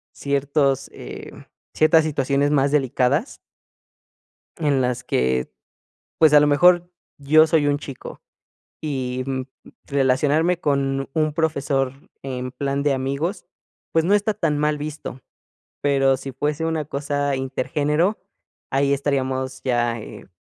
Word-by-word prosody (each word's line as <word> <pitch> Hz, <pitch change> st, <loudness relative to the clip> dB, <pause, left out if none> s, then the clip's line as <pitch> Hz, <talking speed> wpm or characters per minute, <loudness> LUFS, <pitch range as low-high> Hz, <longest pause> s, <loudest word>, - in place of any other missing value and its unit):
ciertos, 140 Hz, -1 st, 0 dB
eh, -, -, -9 dB, 0.4 s
ciertas 160 Hz, +1 st, +4 dB
situaciones 140 Hz, -1 st, +1 dB
más 140 Hz, -1 st, +2 dB
delicadas 140 Hz, -, +1 dB, 1.2 s
en 145 Hz, -5 st, +1 dB
las 125 Hz, -1 st, -1 dB
que, 65 Hz, 0 st, 0 dB, 0.7 s
pues, 155 Hz, -2 st, +5 dB
a 150 Hz, -, +9 dB
lo 145 Hz, -, +4 dB
mejor, 175 Hz, +4 st, +4 dB, 0.3 s
yo 155 Hz, +3 st, +5 dB
soy 155 Hz, -3 st, +2 dB
un 145 Hz, 0 st, +2 dB
chico, 140 Hz, -3 st, -9 dB, 0.6 s
y 130 Hz, -4 st, -3 dB
mm, 135 Hz, -1 st, -2 dB, 0.4 s
relacionarme 145 Hz, +6 st, +2 dB
con 135 Hz, -2 st, 0 dB
un 155 Hz, -2 st, +1 dB
profesor 140 Hz, -4 st, 0 dB, 0.3 s
en 130 Hz, -1 st, -5 dB
plan 140 Hz, +1 st, -2 dB
de 145 Hz, -2 st, +2 dB
amigos, 140 Hz, +9 st, -2 dB, 0.5 s
pues, 160 Hz, 0 st, +2 dB
no 195 Hz, -, +3 dB
está 210 Hz, +1 st, +2 dB
tan 165 Hz, -7 st, 0 dB
mal 150 Hz, 0 st, +1 dB
visto, 150 Hz, -3 st, -6 dB, 0.6 s
pero 135 Hz, -2 st, +3 dB
si 135 Hz, +1 st, -7 dB
fuese 150 Hz, +4 st, -2 dB
una 160 Hz, -2 st, -1 dB
cosa 145 Hz, -1 st, -2 dB
intergénero, 150 Hz, +8 st, 0 dB, 0.5 s
ahí 140 Hz, +1 st, +2 dB
estaríamos 130 Hz, -2 st, -2 dB
ya, 120 Hz, -2 st, 0 dB
eh, -, -, -11 dB
140 Hz, 125 wpm, -22 LUFS, 135-155 Hz, 1.2 s, a